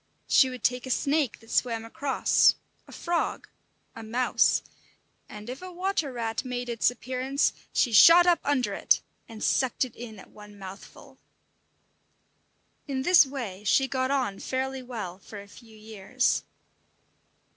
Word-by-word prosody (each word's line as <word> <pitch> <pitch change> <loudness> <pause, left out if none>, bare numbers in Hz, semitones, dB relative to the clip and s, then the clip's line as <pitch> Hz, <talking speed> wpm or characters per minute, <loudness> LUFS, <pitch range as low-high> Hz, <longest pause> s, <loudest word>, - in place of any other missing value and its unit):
She 265 - +5
would 255 -1 -9
take 250 +1 0
a - - -6
snake 280 0 0
that 225 - -15
swam 230 -2 0
across, 280 +3 +2 0.3
a - - -14
frog, 345 -1 -2 0.5
a 225 - -8
mouse; 235 +3 +1 0.7
and 210 +1 -10
if 255 +5 -7
a 370 0 -8
water 360 -5 -2
rat 230 -1 -3
made 245 -1 -5
its 230 -2 +2
appearance, 255 +3 -1 0.2
she 245 - +1
shot 335 - +8
up 350 -1 +4
under 280 -3 0
it, - - +2 0.3
and 220 -1 -9
sucked 260 0 +1
it 245 - -13
in 225 -2 -9
at 190 - -15
one 210 -1 -14
mouthful. 195 0 -12 1.7
In 265 -2 -3
this 350 -2 +6
way 230 -8 -6
she 265 +6 +2
got 260 -1 -1
on 255 -8 -1
fairly 265 0 -3
well 215 -8 -7
for 205 +1 -11
a 200 - -12
few 220 +1 -16
years. 220 +3 -1
250 Hz, 150 wpm, -27 LUFS, 220-270 Hz, 1.7 s, shot